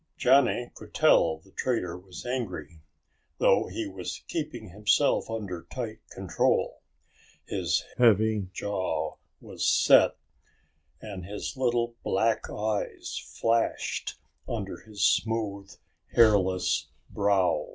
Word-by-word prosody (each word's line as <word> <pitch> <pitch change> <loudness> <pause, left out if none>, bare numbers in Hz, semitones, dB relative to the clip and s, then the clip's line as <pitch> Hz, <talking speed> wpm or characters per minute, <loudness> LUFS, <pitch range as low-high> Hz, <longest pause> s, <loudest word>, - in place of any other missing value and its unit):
Johnny 125 -2 +3
could - - -13
tell 80 -1 +4
the 90 +5 -22
trader 95 -9 -1
was 90 +3 -10
angry. 90 - -4 0.6
Though - - +3
he - - -4
was 95 -2 -6
keeping 150 - -4
himself 105 +10 +2
under 95 -7 -5
tight 115 -4 -5
control, 95 -2 0 0.6
his - - 0 0.2
heavy 110 -3 +4
jaw 90 -6 -2 0.2
was - - -7
set - - +5 0.8
and 100 -4 -7
his 105 +9 -5
little 120 -2 0
black 110 +4 0
eyes 105 -1 -3 0.2
flashed 115 0 0 0.3
under 100 -6 -4
his 105 -2 -2
smooth, 105 -3 0 0.4
hairless 100 -5 +3 0.2
brow. 95 -6 +2
105 Hz, 105 wpm, -28 LUFS, 95-115 Hz, 0.8 s, set